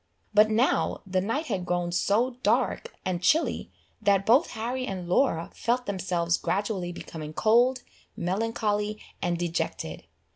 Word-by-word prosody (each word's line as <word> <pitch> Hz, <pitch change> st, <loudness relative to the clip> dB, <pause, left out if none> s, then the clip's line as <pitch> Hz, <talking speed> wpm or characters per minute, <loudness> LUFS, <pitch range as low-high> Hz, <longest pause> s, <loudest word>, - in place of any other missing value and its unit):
But 210 Hz, +1 st, +6 dB
now 225 Hz, +5 st, +1 dB
the 185 Hz, -1 st, 0 dB
night 230 Hz, -, -1 dB
had 190 Hz, -11 st, -2 dB
grown 175 Hz, 0 st, -1 dB
so 225 Hz, +8 st, +1 dB
dark 470 Hz, -, +1 dB
and 180 Hz, -2 st, -1 dB
chilly, 310 Hz, -, +1 dB, 0.3 s
that 195 Hz, -1 st, +3 dB
both 260 Hz, +9 st, +5 dB
Harry 250 Hz, +3 st, -3 dB
and 185 Hz, -3 st, -4 dB
Laura 175 Hz, -3 st, +1 dB
felt 245 Hz, +2 st, 0 dB
themselves 180 Hz, -3 st, 0 dB
gradually 195 Hz, -3 st, -1 dB
becoming 155 Hz, -3 st, -8 dB
cold, 240 Hz, +7 st, +3 dB, 0.3 s
melancholy, 210 Hz, +2 st, -1 dB, 0.2 s
and 175 Hz, -1 st, 0 dB
dejected. 170 Hz, 0 st, -3 dB
205 Hz, 135 wpm, -27 LUFS, 175-235 Hz, 0.3 s, But